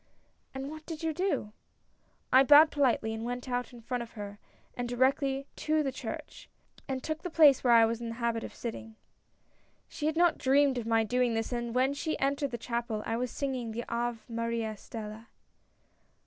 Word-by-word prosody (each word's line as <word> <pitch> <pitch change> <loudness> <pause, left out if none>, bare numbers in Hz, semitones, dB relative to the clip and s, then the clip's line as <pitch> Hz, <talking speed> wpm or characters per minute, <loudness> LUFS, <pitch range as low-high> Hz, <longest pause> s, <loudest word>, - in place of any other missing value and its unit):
" - - -42
And 265 +1 -4
what 310 0 -9
did 325 -1 -6
you 320 -1 0
do? 360 - -1 0.2
" - - -42
" - - -17
I 260 +1 +8
bowed 295 +3 +8
politely, 245 -6 +1
and 220 0 -5
went 245 +2 -4
out 245 0 -2
in 240 -1 -12
front 245 +1 -3
of 235 - -8
her 205 -1 -8 0.4
and 245 -1 -3
directly 270 +2 +1
to 310 0 +1
the 270 - -1
church, - - -7 0.4
and 260 -1 -3
took 315 0 -3
the 360 - -4
place 300 -5 +6
where 245 -2 +5
I 230 -1 +7
was 230 +1 -2
in 235 - -4
the 230 - -5
habit 235 -1 -1
of - - -8
sitting. 225 -1 -6 0.5
" - - -39
She 300 - -3
had 315 +1 -1
not 345 -1 +4
dreamed 270 -1 +3
of 225 - -6
my 225 -1 +3
doing 245 +1 +1
this, 225 +2 -2
and 240 -1 -3
when 260 +2 +3
she 310 +2 -2
entered 280 +1 0
the 240 - -4
chapel, 235 -2 -3
I 225 - -1
was 250 +1 -1
singing 255 -4 -3
the 235 +2 -4
Ave^ 235 0 -1
maris 230 -2 -3
Stella. 220 0 -8
245 Hz, 210 wpm, -30 LUFS, 230-275 Hz, 0.5 s, I